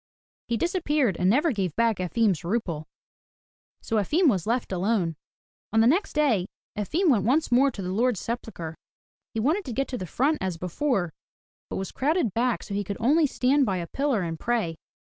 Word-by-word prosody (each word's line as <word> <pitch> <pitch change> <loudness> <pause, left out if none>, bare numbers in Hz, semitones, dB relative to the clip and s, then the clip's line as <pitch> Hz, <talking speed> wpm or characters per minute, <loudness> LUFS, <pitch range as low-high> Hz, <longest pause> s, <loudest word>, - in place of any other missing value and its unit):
He 235 - 0
disappeared 300 - +1
and 180 +1 +3
never 295 - +3
gave 190 - -2
back 230 -3 +2
Efim's 185 0 +1
rouble. 170 -5 -2 0.9
So 225 - -1
Efim 315 - +3
was 190 -5 0
left 240 -1 0
alone. 185 -3 0 0.6
On 225 - +3
the 225 - +5
next 340 - +2
day 250 - +2 0.3
Efim 315 - +1
went 210 -7 +3
once 270 +5 +2
more 265 +3 +5
to 200 -7 -6
the 180 - -3
Lord's 230 +1 +1
sepulchre. 220 -9 -5 0.6
He - - 0
wanted 315 - +1
to 255 - -4
get 275 +3 -1
to 250 - -4
the 185 - -5
front 290 - +1
as 185 -3 -2
before, 180 - -1 0.6
but - - -4
was 190 -1 -4
crowded 290 - 0
back 240 +1 0
so 205 - -7
he 205 +1 -1
could 200 +1 -5
only 295 +6 +4
stand 275 +2 +2
by 190 -2 0
a 175 - -3
pillar 270 0 0
and 165 -2 -4
pray. 225 -9 0
230 Hz, 190 wpm, -26 LUFS, 185-275 Hz, 0.9 s, the